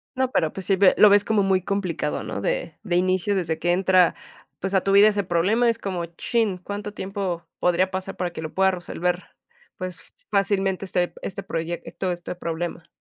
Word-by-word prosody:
No, 260 0 0
pero 160 -2 +1
pues 190 -2 -6
sí 195 - +3
ve 190 0 +5
lo 210 - +8
ves 205 0 +5
como 215 -3 +2
muy 190 -1 +2
complicado, 180 -6 -2
¿no? - - -5
De - - -2
de 180 -5 -1
inicio, 185 +2 +2
desde 165 -4 -1
que 175 +1 +1
entra, 185 -1 +4 0.4
pues, 195 +1 -3
a 190 - +4
tu 195 - +1
vida 200 +2 +8
ese 205 -1 0
problema, 200 +8 +2
es 230 - 0
como, 185 -5 -3
chin, 200 +3 -1
¿cuánto 205 +3 -6
tiempo 190 -4 -4
podría 185 +2 +2
pasar 190 +1 -4
para 180 -1 -2
que - - -6
lo 155 - -6
pueda 190 0 +3
resolver, 180 0 -2 0.5
pues, 185 -2 -7 0.2
fácilmente 195 -1 +1
este 180 -1 -1
este 195 +1 -5
proyecto, 170 +1 -3
este 175 0 -5
problema? 170 0 -4
185 Hz, 195 wpm, -24 LUFS, 175-200 Hz, 0.5 s, lo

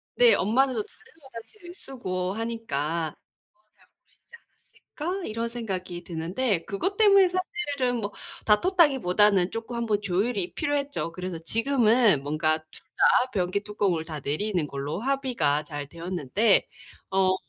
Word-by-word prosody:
네. 485 -1 +6
엄마는 260 +6 +2
또 425 - -1
다른 455 +2 -23
화장실을 310 - -12
쓰고 185 - -2
하니까 170 -9 -3 0.4
뭐 350 - -38
'잘 - - -27
모르시지 475 - -36 0.7
않았을까?' 365 +2 -2
이런 230 +2 -3
생각이 185 -7 -5
드는데 175 +4 -2
그것 375 - -2
때문에 395 -3 +6
사실은 290 -9 -2
뭐 205 -1 -3 0.3
다퉜다기보다는 210 - +3
쪼끔 230 +1 -5
한번 220 -3 0
조율이 200 0 -1
필요했죠. 280 - -2
그래서 180 -1 -5
지금은 225 - +3
뭔가 155 +2 +1
둘 - - -14 0.4
다 260 - -17
변기 185 +1 0
뚜껑을 195 -6 -1
다 155 -2 -6
내리는 170 +2 -1
걸로 140 +5 -4
합의가 250 - 0
잘 145 -1 -6
되었는데 180 - +1 0.4
어 190 -1 +3
210 Hz, 310 characters per minute, -26 LUFS, 175-265 Hz, 0.7 s, 네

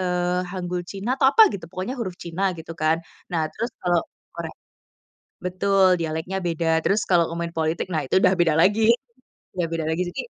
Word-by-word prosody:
eee, 180 0 0
hanggul 180 -1 -3
China 205 +6 -2
atau 265 - +6
apa 445 -1 +8
gitu, 180 -4 -6
pokoknya 190 +8 -4
huruf 185 -5 -4
China 185 +3 -1
gitu 160 +1 -8
kan. 155 +1 +2 0.3
Nah 160 -2 +1
terus 230 +3 -3
kalau 175 -2 +2 0.3
Korea - - -5 0.9
betul, 185 0 +3
dialeknya 160 +4 -2
beda. 165 -1 +1
Terus 210 +2 +2
kalau 170 -3 +3
main 170 0 -4
politik, 160 +1 -1
nah 155 -2 0
itu 185 - +3
udah 185 - +5
beda 165 -3 +3
lagi 215 +6 +4 0.7
udah 170 - 0
beda 165 -1 -1
lagi. 170 +3 0
Jadi, - - -4
180 Hz, 180 wpm, -23 LUFS, 165-190 Hz, 0.9 s, apa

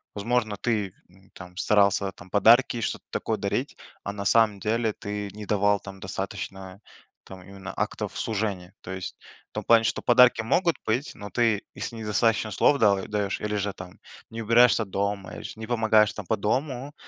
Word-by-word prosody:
возможно 110 0 -1
ты, 105 -4 -1 0.2
м, 95 +2 -23
там, 90 0 -12
старался, 100 -1 +2
там, 90 - -15
подарки, 115 +5 +4
что-то - - -3
такое - - -2
дарить. - - -3 0.3
А 100 - -3
на 100 -1 -6
самом 110 -1 +3
деле 110 +2 0
ты 105 -1 -5
не 105 0 -8
давал, 105 0 +2
там, 95 0 -11
достаточно, 95 0 -6 0.4
там, 95 -1 -11
именно 100 +1 -9
актов - - -3
служения. 100 -4 -3
То 90 - -8
есть 95 -1 -6 0.3
в - - -69
том - - -4
плане, 115 -1 +5
что - - -1
подарки 125 -1 +5
могут 170 +9 +1
быть. 125 +7 -1
Но 105 -1 -8
ты, 115 -4 +1
если 120 - -5
недостаточно 110 0 +1
слов 140 +8 +3
дал 100 -3 +3
даешь 105 -2 -2
или 105 0 -2
же 100 -1 -2
там 95 -1 -11 0.3
не 115 0 -5
убираешься 115 0 +5
дома, 100 0 -3
или - - -8
ж - - -8
не 110 - -6
помогаешь, 110 -3 +3
там, 105 - -7
по 110 - +1
дому, 130 +6 -2
105 Hz, 185 wpm, -26 LUFS, 100-115 Hz, 0.4 s, плане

